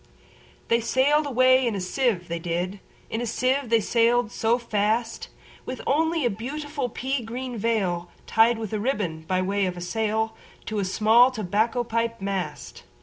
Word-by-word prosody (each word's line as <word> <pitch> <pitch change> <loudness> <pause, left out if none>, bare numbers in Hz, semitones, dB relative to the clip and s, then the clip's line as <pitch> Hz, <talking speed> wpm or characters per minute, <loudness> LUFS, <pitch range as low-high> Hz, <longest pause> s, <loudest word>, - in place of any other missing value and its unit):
They 230 - +4
sail'd 285 +6 +2
away 255 -1 +4
in 225 - -1
a - - -2
sieve, 185 -1 0
they 170 0 -3
did, 175 +4 -3 0.3
In 225 - -2
a 240 - -2
sieve 255 +3 0
they 230 0 +4
sail'd 235 +1 +2
so 230 +2 +1
fast, 225 0 -1 0.4
With 255 - -6
only 320 +1 +1
a - - +3
beautiful 280 +5 -4
pea 265 +3 -2
green 245 +2 -5
veilTied 220 +2 +1
with 220 -2 -5
a 215 - 0
ribbon, 205 -9 -2
by 185 +1 +1
way 195 +1 0
of 180 -1 -4
a - - -6
sail, 220 +3 -1 0.3
To 215 -1 -2
a 195 - 0
small 220 +6 +5
tobacco 225 +1 0
pipe 230 0 -2
mast. 195 -2 -4
225 Hz, 165 wpm, -25 LUFS, 200-250 Hz, 0.4 s, small